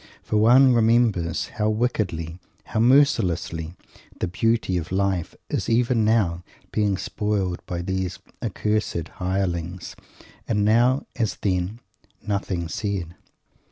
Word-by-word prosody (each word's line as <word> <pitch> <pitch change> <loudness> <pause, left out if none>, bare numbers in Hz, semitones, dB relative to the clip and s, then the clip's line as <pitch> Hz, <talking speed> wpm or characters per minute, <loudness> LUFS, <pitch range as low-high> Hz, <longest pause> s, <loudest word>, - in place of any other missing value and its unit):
For 105 - 0
one 125 +4 +6
remembers 110 -7 +2
how 105 0 -1
wickedly, 95 -8 -1 0.2
how - - -3
mercilessly, 110 - +2 0.4
the - - 0
beauty 110 +1 +1
of 85 -1 -3
life 95 -3 0
is - - -2
even 115 0 +2
now 100 -6 +2 0.3
being 105 -3 +1
spoiled 100 -3 -2
by 85 -1 -3
these 95 0 -2 0.2
accursed 105 -5 -1
"hirelings" 90 -1 -2 0.5
and 105 -2 +1
now, 120 +5 +3
as 110 -3 -1
then, 95 +3 -2 0.4
"nothing 95 -4 -2
said." 95 -2 -3
100 Hz, 115 wpm, -24 LUFS, 90-115 Hz, 0.5 s, one